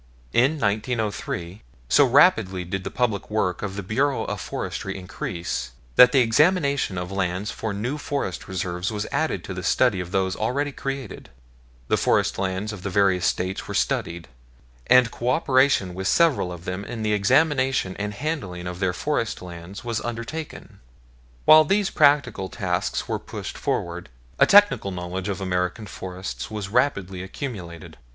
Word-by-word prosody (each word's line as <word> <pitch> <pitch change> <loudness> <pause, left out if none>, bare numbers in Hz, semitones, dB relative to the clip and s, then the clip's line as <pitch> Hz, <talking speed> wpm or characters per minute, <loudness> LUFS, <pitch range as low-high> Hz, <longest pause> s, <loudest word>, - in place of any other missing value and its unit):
In 130 +6 +4
1903, 105 - -2 0.3
so 145 - +5
rapidly 115 - +4
did 95 +2 -4
the - - -4
public 110 -6 -1
work 95 -5 -1
of 100 -2 -4
the 100 - -4
Bureau 135 +8 0
of - - -4
Forestry 95 0 -4
increase, 85 -8 -5 0.2
that 125 0 +8
the 135 - +5
examination 140 - +2
of 90 +1 -4
land 95 +1 -2
for 110 - -4
new 120 +9 -3
forest 140 - -3
reserves 90 +1 -3
was 105 -1 -3
added - - -1
to - - -6
the - - -5
study 95 - +2
of 90 -1 -5
those 95 0 0
already 140 +6 -1
created, 135 -5 -6 0.6
the - - +2
forest - - +1
lands 95 +3 -2
of 100 - -8
the 95 - -3
various 95 -2 +2
States 95 +1 -2
were - - -5
studied, 85 -1 -1 0.6
and 125 -2 +6
cooperation 130 - +2
with 95 +1 -3
several 145 - +3
of 85 -1 -9
them 90 +2 -4
in 115 0 -6
the 105 0 +1
examination 130 -1 +2
and 105 0 -3
handling 100 - -4
of 90 0 -5
their 95 -2 +1
forest 115 +2 -2
lands 90 +2 -9
was 115 -2 -2
undertaken. 120 +7 -6 0.7
While 155 0 +9
these 195 +5 +1
practical 140 - +3
tasks 90 -5 -2
were - - -2
pushed - - -7
forward, 85 -3 -3 0.3
a - - +6
technical 205 - +5
knowledge 90 +1 -4
of 100 -1 -3
American 90 +2 -2
Forests 95 -1 -6
was 105 -3 -5
rapidly 100 -6 0
accumulated. 95 - -7
100 Hz, 160 wpm, -24 LUFS, 90-130 Hz, 0.7 s, While